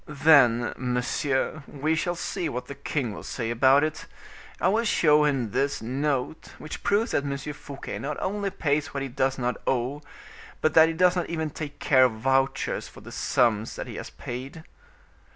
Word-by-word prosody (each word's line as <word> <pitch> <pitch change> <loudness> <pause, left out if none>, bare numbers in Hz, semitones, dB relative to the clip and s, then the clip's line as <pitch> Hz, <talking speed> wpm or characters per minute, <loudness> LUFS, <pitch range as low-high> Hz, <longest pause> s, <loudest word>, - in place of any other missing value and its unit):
"Then, 140 -6 +4
monsieur, 130 +4 -1
we 150 +3 -1
shall 175 +2 -1
see 170 -1 -3
what 125 -2 -4
the - - -7
king 140 -4 -3
will - - -8
say 115 -2 -4
about 135 +4 +5
it. 155 -1 -3 0.5
I - - +2
will 220 +4 +2
show 150 -8 +4
him 130 -7 0
this 135 +4 0
note, 135 +4 -2
which 155 - -8
proves 210 +3 +1
that 140 - +1
M. 140 -1 -2
Fouquet 140 -1 -7
not 145 +1 -4
only 200 +1 -2
pays 150 -4 -1
what 140 - -1
he 135 - -4
does 135 +1 0
not 125 -1 -1
owe, 130 +3 0 0.6
but 155 - +1
that 160 0 +7
he 165 - -2
does 180 +1 +4
not 175 - -2
even 160 -2 -2
take 145 -1 -7
care 130 -2 +5
of 125 - +1
vouchers 135 +4 0
for - - -14
the 120 +3 -11
sums 120 -3 +1
that - - -5
he - - -8
has - - -6
paid." 130 +6 -7
140 Hz, 190 wpm, -26 LUFS, 125-155 Hz, 0.6 s, that